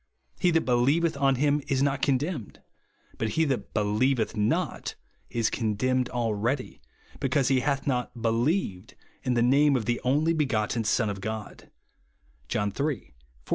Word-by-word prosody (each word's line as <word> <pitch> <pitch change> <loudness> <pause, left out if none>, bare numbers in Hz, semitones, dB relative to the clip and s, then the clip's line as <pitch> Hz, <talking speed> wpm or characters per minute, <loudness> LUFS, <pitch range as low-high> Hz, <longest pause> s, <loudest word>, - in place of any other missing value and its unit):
He 180 - +3
that 165 -1 +3
believeth 140 +7 +2
on 135 -1 +2
him 145 +2 +2
is 135 0 +1
not 140 -1 0
condemned: 140 - -1 0.6
but 110 - 0
he 160 - +4
that 130 -7 -2
believeth 110 +3 +1
not 105 0 -1 0.3
is 115 -2 0
condemned 125 +3 0
already, 115 - -2 0.4
because 135 -1 +1
he 135 -1 +3
hath 140 +1 -1
not 125 -2 -2
believed 115 - 0 0.3
in 125 -2 0
the 120 - +3
name 140 +3 +4
of 120 -4 -1
the 120 0 -1
only 150 +6 +2
be 155 -3 +1
gotten 110 0 0
Son 110 +1 +2
of 95 -1 -7
God," 110 +1 -6 0.8
(John 105 +5 0
iii. - - -10
14 145 - +2 0.2
18). - - -29
125 Hz, 160 wpm, -27 LUFS, 110-140 Hz, 0.8 s, he